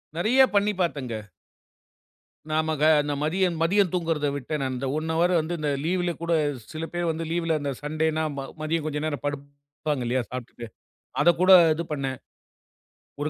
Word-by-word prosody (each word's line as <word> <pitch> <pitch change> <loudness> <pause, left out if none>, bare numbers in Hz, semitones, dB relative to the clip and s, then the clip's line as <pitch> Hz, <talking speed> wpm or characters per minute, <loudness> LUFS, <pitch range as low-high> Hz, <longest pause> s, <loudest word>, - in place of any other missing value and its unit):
நெறைய 225 +10 +3
பண்ணி 205 +1 +3
பார்த்தேங்க. 135 -9 -2 1.4
நாம 160 +1 +1
க - - 0 0.2
இந்த 145 0 -2
மதியம் 175 +2 +1
மதியம் 190 +1 +3
தூங்குறத 165 -4 0
விட்டேன் 145 +2 -3
நான். 130 -1 -1
அந்த 125 +2 -4
1 160 +1 -2
ஹவர் 175 +2 +2
வந்து 165 +3 -4
இந்த 150 - -1
லீவுல 175 +1 0
கூடச் 155 -4 0 0.2
சில 160 +1 -4
பேர் 175 0 -1
வந்து 165 +1 -4
லீவுல 165 -1 0
அந்த 145 -1 -2
சண்டேன்னா 155 +1 0
ம - - -2 0.2
மதியம் 155 0 -1
கொஞ்சம் 150 0 -2
நேரம் 145 -2 -3
படுப்பாங்க 140 -1 -4
இல்லையா 125 +1 0
சாப்டுட்டு. 120 -1 -7 0.6
அதக் 170 -1 +4
கூட 185 +1 +4 0.2
இது 170 +2 -3
பண்ணேன். 135 -2 -2 1.1
ஒரு 150 - 0
155 Hz, 165 wpm, -25 LUFS, 145-170 Hz, 1.4 s, அதக்